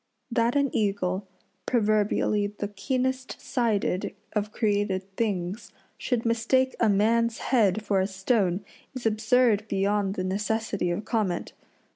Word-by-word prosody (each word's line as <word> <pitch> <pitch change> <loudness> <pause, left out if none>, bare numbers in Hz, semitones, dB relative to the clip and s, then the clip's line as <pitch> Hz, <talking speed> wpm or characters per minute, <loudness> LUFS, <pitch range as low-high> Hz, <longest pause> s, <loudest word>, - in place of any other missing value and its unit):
That 235 +1 +2
an 280 -2 +1
eagle, 195 -2 0 0.4
proverbially 210 -2 +2
the 205 - -3
keenest 255 +5 -2
sighted 220 -8 -1 0.2
of 210 0 -1
created 200 -3 -1
things, 195 -1 -2 0.2
should 240 -2 -2
mistake 235 +3 +2
a 225 - +4
man's 225 +3 +2
head 215 -5 +2
for 200 -2 +1
a 190 - +1
stone 195 -1 0 0.3
is 255 - -6
absurd 220 0 +3
beyond 200 0 0
the 185 - -2
necessity 205 0 -1
of 175 +5 -2
comment. 210 -7 -1
210 Hz, 125 wpm, -26 LUFS, 195-230 Hz, 0.4 s, a